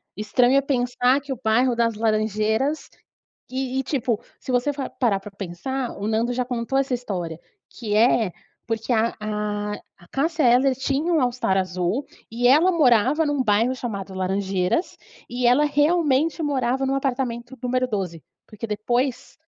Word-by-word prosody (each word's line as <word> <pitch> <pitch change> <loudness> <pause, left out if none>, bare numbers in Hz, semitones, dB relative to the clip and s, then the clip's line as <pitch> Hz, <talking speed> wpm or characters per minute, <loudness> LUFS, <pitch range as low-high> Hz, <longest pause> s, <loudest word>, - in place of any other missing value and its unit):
estranho 245 +5 +3
é - - +4
pensar 250 0 +1
que 280 -1 -8
o 245 - -10
bairro 245 +3 +3
das 230 -2 +1
Laranjeiras 220 +6 0 0.6
e 260 0 -2
e, - - -1
tipo, 245 -5 -1 0.2
se 260 - -5
você 250 +4 +1
for 275 -1 -4
parar 215 -6 +2
pra 210 - -10
pensar, 205 +8 -4
o 200 - -4
Nando 230 +3 0
já 250 0 0
contou 245 +1 -2
essa 270 -1 -1
história 180 -9 -4 0.3
que 210 -3 -4
é 220 -3 +4 0.4
porque 225 +2 -2
a 230 0 +2
a 210 -1 -2 0.3
a 175 - -18
Cássia 315 +2 0
Eller 255 +2 +4
tinha 280 +6 -1
um 310 - +3
All 245 -1 +2
Star 215 -6 0
azul 185 +7 -1 0.2
e 240 +2 +1
ela 315 +7 +6
morava 275 - +3
num 290 -2 0
bairro 225 +3 +2
chamado 200 -6 -5
Laranjeiras 190 - -1 0.3
e 245 0 0
ela 250 +5 +5
realmente 300 +1 +2
morava 270 -2 0
num 270 - 0
apartamento 255 -2 -2
número 255 0 0
12. 185 -8 -3 0.3
Porque, 220 +2 -7
depois, 240 +5 -2
245 Hz, 165 wpm, -23 LUFS, 215-270 Hz, 0.6 s, ela